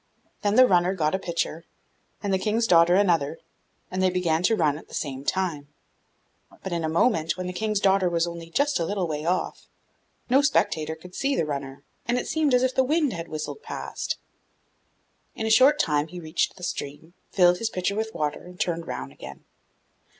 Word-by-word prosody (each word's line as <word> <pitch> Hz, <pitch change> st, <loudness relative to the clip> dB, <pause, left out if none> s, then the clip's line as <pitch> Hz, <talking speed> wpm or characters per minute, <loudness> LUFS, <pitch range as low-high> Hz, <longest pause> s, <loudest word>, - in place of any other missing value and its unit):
Then 205 Hz, 0 st, +1 dB
the 255 Hz, -, +8 dB
runner 180 Hz, -3 st, +3 dB
got 155 Hz, -2 st, 0 dB
a 190 Hz, -, +1 dB
pitcher, 170 Hz, -2 st, -3 dB, 0.6 s
and 200 Hz, -1 st, 0 dB
the 190 Hz, -, +2 dB
King's 220 Hz, +3 st, +1 dB
daughter 175 Hz, -3 st, +5 dB
another, 165 Hz, -7 st, +2 dB, 0.5 s
and 185 Hz, 0 st, -1 dB
they 185 Hz, -, +4 dB
began 175 Hz, -3 st, +1 dB
to 225 Hz, +5 st, +3 dB
run 155 Hz, -7 st, +2 dB
at -, -, -17 dB
the -, -, -9 dB
same 135 Hz, -2 st, -4 dB
time; 165 Hz, -5 st, -1 dB, 1.0 s
but 190 Hz, -, -5 dB
in 170 Hz, -1 st, -1 dB
a 160 Hz, -, 0 dB
moment, 165 Hz, -1 st, +2 dB
when 185 Hz, -, -4 dB
the 180 Hz, -, -4 dB
King's 215 Hz, +1 st, -1 dB
daughter 190 Hz, -2 st, +3 dB
was 170 Hz, -1 st, +1 dB
only 170 Hz, -1 st, -7 dB
just 285 Hz, -, +1 dB
a -, -, +1 dB
little 190 Hz, -1 st, -1 dB
way 150 Hz, -1 st, -4 dB
off, 180 Hz, +2 st, -2 dB, 0.6 s
no 265 Hz, +3 st, +5 dB
spectator 165 Hz, -, +1 dB
could 180 Hz, +3 st, -14 dB
see 275 Hz, +6 st, 0 dB
the 165 Hz, -, +1 dB
runner, 140 Hz, -1 st, -5 dB, 0.2 s
and 240 Hz, +1 st, +1 dB
it -, -, -2 dB
seemed 305 Hz, -5 st, +2 dB
as 250 Hz, -, +3 dB
if 260 Hz, 0 st, +1 dB
the 265 Hz, -, +3 dB
wind 295 Hz, 0 st, +1 dB
had 170 Hz, -1 st, -6 dB
whistled 155 Hz, -, -5 dB
past. -, -, -4 dB, 1.2 s
In 220 Hz, -, -3 dB
a 220 Hz, -, +1 dB
short 265 Hz, +6 st, +6 dB
time 150 Hz, -, +1 dB
he 180 Hz, +2 st, -8 dB
reached 160 Hz, 0 st, -1 dB
the 180 Hz, -, -13 dB
stream, 160 Hz, 0 st, -5 dB, 0.2 s
filled 180 Hz, -2 st, +4 dB
his 230 Hz, -, -1 dB
pitcher 185 Hz, -2 st, -1 dB
with 220 Hz, +1 st, -3 dB
water, 150 Hz, -1 st, -2 dB
and 180 Hz, 0 st, -13 dB
turned 170 Hz, -1 st, -1 dB
round 65 Hz, +1 st, -5 dB
again. 70 Hz, -1 st, -11 dB
180 Hz, 200 wpm, -25 LUFS, 160-215 Hz, 1.2 s, the